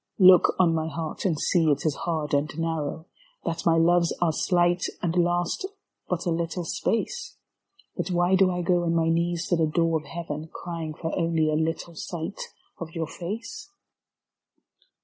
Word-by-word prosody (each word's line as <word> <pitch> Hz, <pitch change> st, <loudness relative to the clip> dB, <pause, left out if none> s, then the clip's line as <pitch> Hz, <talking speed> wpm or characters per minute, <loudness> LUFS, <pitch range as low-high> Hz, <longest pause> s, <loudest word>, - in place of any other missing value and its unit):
r 185 Hz, -, +6 dB
look 185 Hz, -1 st, +7 dB
on 175 Hz, -3 st, +4 dB
my 160 Hz, -1 st, -1 dB
heart 160 Hz, +3 st, -5 dB
and 165 Hz, -6 st, +1 dB
see 165 Hz, -1 st, +2 dB
it 145 Hz, 0 st, +1 dB
is 155 Hz, -, +2 dB
hard 155 Hz, -1 st, -3 dB
and 145 Hz, +2 st, 0 dB
narrow, 160 Hz, -1 st, -2 dB, 0.4 s
That 165 Hz, +1 st, -2 dB
my 165 Hz, -1 st, +5 dB
loves 170 Hz, +1 st, +4 dB
are 170 Hz, -3 st, +2 dB
slight 175 Hz, +1 st, +2 dB
and 170 Hz, -1 st, -1 dB
last 175 Hz, -, +1 dB, 0.4 s
but 180 Hz, -2 st, -1 dB
a 175 Hz, -, +1 dB
little 170 Hz, +1 st, -2 dB
space. 465 Hz, -, -2 dB, 0.6 s
But -, -, -3 dB
why 175 Hz, +1 st, +2 dB
do 190 Hz, 0 st, +5 dB
I 180 Hz, -1 st, -2 dB
go 175 Hz, 0 st, +2 dB
on 170 Hz, -1 st, +1 dB
my 165 Hz, -1 st, +2 dB
knees 170 Hz, +1 st, 0 dB
to 175 Hz, -, +3 dB
the 160 Hz, -1 st, +2 dB
door 165 Hz, 0 st, +1 dB
of 155 Hz, -, -15 dB
Heaven 160 Hz, -2 st, -5 dB
Crying 165 Hz, -3 st, -5 dB
for 165 Hz, +1 st, -4 dB
only 165 Hz, -3 st, +1 dB
a -, -, +1 dB
little 165 Hz, +2 st, -2 dB
sight 165 Hz, +3 st, -5 dB, 0.4 s
of 165 Hz, -1 st, -7 dB
your 165 Hz, -1 st, -1 dB
face? 220 Hz, -, -6 dB
165 Hz, 180 wpm, -26 LUFS, 160-175 Hz, 0.6 s, look